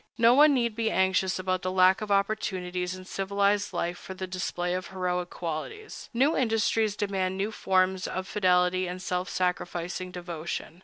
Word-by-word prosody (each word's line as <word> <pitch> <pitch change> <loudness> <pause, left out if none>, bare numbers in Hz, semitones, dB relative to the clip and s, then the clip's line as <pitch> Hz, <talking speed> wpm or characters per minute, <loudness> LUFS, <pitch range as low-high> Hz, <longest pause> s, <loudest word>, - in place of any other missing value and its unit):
No 230 +1 +6
one 290 +2 +6
need 235 -3 0
be 225 -1 0
anxious 190 -1 +2
about 185 0 -1
the 185 - -2
lack 185 +3 +4
of 215 - -4
opportunities 185 -3 -1
in 185 0 -10
civilized 200 +2 0
life 175 +1 -2
for 190 - -8
the 185 0 -4
display 180 -1 -2
of 185 0 -3
heroic 180 -1 -2
qualities. 175 - -6
New 270 +6 +2
industries 225 -3 +1
demand 190 -2 -1
new 200 +3 -1
forms 185 -2 +1
of 185 0 -4
fidelity 185 -2 +2
and 180 +1 -5
self 180 0 -2
sacrificing 180 0 -2
devotion. 170 -1 -6
185 Hz, 165 wpm, -28 LUFS, 180-205 Hz, -, No